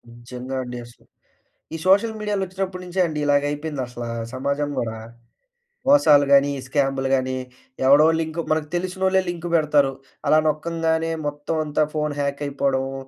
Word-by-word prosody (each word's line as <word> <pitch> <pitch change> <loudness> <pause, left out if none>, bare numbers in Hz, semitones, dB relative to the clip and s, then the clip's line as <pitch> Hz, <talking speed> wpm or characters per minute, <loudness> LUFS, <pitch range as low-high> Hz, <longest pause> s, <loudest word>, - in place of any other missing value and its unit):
నిజంగా 125 +2 -7
అండి 125 0 -7
అసలు. 120 - -19 0.7
ఈ - - -3
సోషల్ 205 +4 +4
మీడియాలొచ్చినప్పటి 190 -3 -3
నుంచే 180 +1 -4
అండి 155 -1 -4
ఇలాగ 145 0 +3
అయిపోయిందసలా, 130 -6 -4 0.2
సమాజం 140 +3 -1
కూడా. 115 -2 -3 0.9
మోసాలు 150 - +6
గానీ, 140 0 +6
ఈ - - -7
స్కాములు 135 -1 0
గానీ, 130 0 -1 0.5
ఎవడో 145 +4 +7
లింకు 160 +1 -2
మనకు 155 -1 +1
తెలిసినోళ్ళే 190 +1 +1
లింక్ 175 0 -4
పెడతారు. 145 -4 +3 0.3
అలా 155 - +5
నొక్కంగానే 165 +1 0
మొత్తవంతా 150 +1 -1
ఫోను 150 -1 -1
హ్యాక్ 140 0 -2
అయిపోడమూ, 135 -1 -1
150 Hz, 135 wpm, -22 LUFS, 135-165 Hz, 0.9 s, ఎవడో